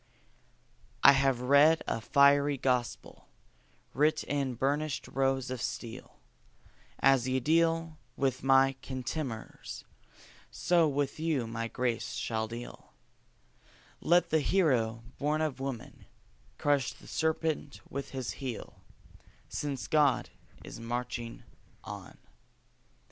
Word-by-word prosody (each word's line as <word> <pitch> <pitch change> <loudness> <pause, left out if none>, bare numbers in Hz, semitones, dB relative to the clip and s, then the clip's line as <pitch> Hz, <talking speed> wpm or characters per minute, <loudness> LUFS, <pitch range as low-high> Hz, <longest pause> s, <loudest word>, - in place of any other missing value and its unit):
I 140 - +11
have 135 -2 +2
read 140 +5 +5
a 115 - -1
fiery 140 +2 +4
gospel, 125 -2 -2 0.7
writ 150 +3 +2
in 135 -3 -2
burnished 145 +4 -1
rows 135 -1 0
of 130 -2 -4
steel: 120 +1 -6 0.8
"As 135 -2 +4
ye 130 0 +1
deal 165 +2 +1 0.2
with 130 -2 0
my 135 0 +4
contemners, 130 -2 -5 0.7
so 170 -2 +2
with 145 0 -1
you 155 -6 0
my 115 0 -3
grace 120 0 -2
shall 110 -1 -2
deal; 120 +2 -9 1.1
Let 175 +1 +3
the 160 - +4
Hero, 125 -11 +1 0.2
born 150 +2 +1
of 155 -4 -1
woman, 135 -4 -6 0.5
crush 145 -3 +1
the - - -17
serpent 160 -2 -1
with 140 +1 -5
his 130 -3 -4
heel, 125 -4 -6 0.7
Since 140 -3 -3
God 150 -4 +2 0.3
is - - -9
marching 120 0 -4 0.4
on." - - -9
135 Hz, 110 wpm, -30 LUFS, 125-150 Hz, 1.1 s, I